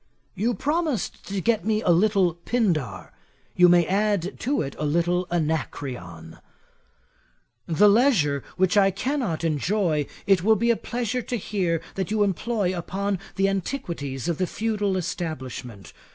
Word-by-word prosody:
'You 220 +5 0
promised 305 -4 -2
to 200 0 -2
get 225 +2 +1
me 215 +1 0
a - - +4
little 190 -1 +3
Pindar, 170 - -1 0.4
you 180 0 +6
may 175 -1 +5
add 200 0 0
to 275 - 0
it 135 -1 -6
a - - -2
little 175 +4 +1
Anacreon. 130 - -3 1.3
'The 180 +6 +4
leisure 200 - +3
which 185 0 +2
I 195 -1 +5
cannot 200 - -2
enjoy, 160 -1 0 0.2
it 195 -4 +3
will 220 +2 +5
be 235 +3 +2
a - - +3
pleasure 245 +2 -3
to 250 +1 -4
hear 180 -6 -1
that 190 -2 -3
you 215 0 +2
employ 200 0 0
upon 195 +2 -2 0.2
the 195 0 +2
antiquities 170 - -3
of 170 -3 -1
the 185 - +1
feudal 210 -3 -1
establishment. 130 - -5
190 Hz, 145 wpm, -25 LUFS, 160-215 Hz, 1.3 s, you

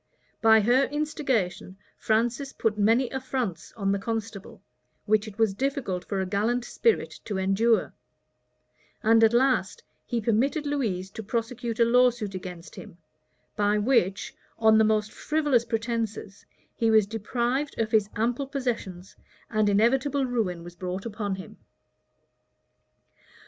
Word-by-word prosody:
By 220 -1 +6
her 245 +6 +3
instigation, 265 - -2 0.2
Francis 235 +5 0
put 220 -2 0
many 225 +5 +3
affronts 255 - -4
on 195 -3 -1
the 200 - 0
constable, 220 -2 -5 0.4
which 215 0 +2
it 210 -1 -10
was 220 -3 +2
difficult 245 -6 -2
for 195 - -3
a 190 - 0
gallant 220 +6 0
spirit 460 - 0
to 205 -3 -3
endure; 195 +5 +2 1.1
and 225 +1 +5
at 220 - +6
last 260 - +1 0.2
he 240 - -2
permitted 245 +8 0
Louise 215 -11 -2
to 220 - -7
prosecute 230 +1 -3
a 235 - +6
lawsuit 240 -3 +2
against 180 -2 -8
him, 205 -6 -11 0.6
by 205 0 +2
which, 205 -4 +1 0.2
on 220 -1 +5
the - - +5
most 215 -1 +1
frivolous 295 -6 +1
pretences, 225 -3 -4 0.3
he 230 - +1
was 220 -2 +5
deprived 240 +6 -2
of 220 -1 -1
his 215 -2 +2
ample 240 +5 -1
possessions; 230 -9 -4 0.4
and 215 -2 +2
inevitable 260 +7 +2
ruin 210 -9 -2
was 175 0 -11
brought 185 +2 -5
upon 205 -3 -3
him. 185 -3 -11
225 Hz, 135 wpm, -26 LUFS, 200-245 Hz, 1.1 s, By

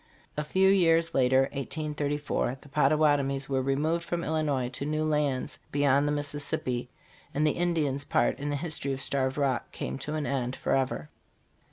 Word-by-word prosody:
A 150 - -1
few 190 +5 +3
years 165 -4 +4
later 130 0 +4
(1834) 145 -2 -2
the 145 - -15
Pottawatomies 140 -1 +2
were 135 -1 0
removed 150 +6 0
from 175 0 -2
Illinois 150 -6 0
to 135 - -5
new 155 +2 -1
lands 150 -4 0
beyond 145 0 +3
the - - +1
Mississippi; 145 -4 -2 0.5
and 150 +2 +2
the 150 - +4
Indian's 155 -6 0
part - - +1
in 145 +1 -3
the 145 - 0
history 145 -2 -2
of 135 - -5
Starved 135 -1 0
Rock 135 -4 0
came 65 +1 -4
to 150 - -4
an 155 -2 -2
end 130 -2 -1
forever. 130 - -1
145 Hz, 165 wpm, -28 LUFS, 135-155 Hz, 0.5 s, years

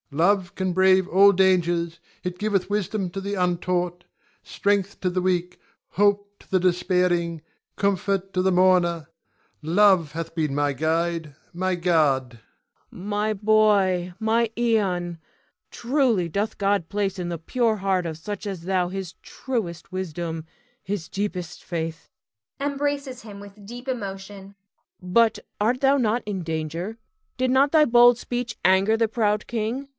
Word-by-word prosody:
Ion. 140 - -9
Love 190 +2 +2
can 185 -1 -1
brave 190 0 +4
all 200 +2 +6
dangers. 175 -3 +1 0.2
It 180 0 -4
giveth 205 -3 0
wisdom 205 -2 -1
to 195 - -5
the 200 +1 -3
untaught, 180 -1 -1 0.4
strength 200 -1 -1
to 185 - +1
the 185 0 -1
weak, 180 -1 -1 0.3
hope 205 0 +1
to - - -22
the 190 - +3
despairing, 180 -2 +1 0.4
comfort 195 -1 0
to 185 - +1
the 190 +1 +2
mourner. 180 -3 +3 0.5
Love 175 -1 +4
hath 165 +1 -6
been 155 -4 -1
my 145 -1 +1
guide, 160 +1 -1 0.2
my 185 +1 -1
guard. 155 -7 +2 0.6
Cleon. 180 - -11
My 210 +1 0
boy! 200 -4 +2
my 225 +1 +1
Ion! 190 -8 0 0.5
Truly 240 - +1
doth 205 +6 -2
God 200 -4 0
place 200 -1 -1
in 175 -1 -3
the 170 - -3
pure 225 +6 0
heart 190 -2 0
of 160 -1 -5
such 205 +5 -6
as 190 -4 -5
thou 180 -1 0
his 190 -2 -5
truest 195 -12 -5
wisdom, 170 -3 -4 0.4
his 190 -5 -4
deepest 185 -4 -4
faith 165 -2 -5 0.5
[embraces 280 -2 -2
him 205 -4 -10
with 200 0 -13
deep 245 +4 -9
emotion]. 200 -4 -6 0.5
But 220 +5 +2 0.2
art 240 +4 +1
not 275 0 +4
thou 225 0 +2
in 190 -3 -3
danger? 165 +6 -4 0.4
Did 255 -1 +1
not 275 +2 +4
thy 310 -2 +5
bold 240 -1 +6
speech 245 -1 -4
anger 195 +4 +4
the 225 0 +2
proud 210 -2 0
king? 235 +4 -3
190 Hz, 150 wpm, -24 LUFS, 175-215 Hz, 0.6 s, all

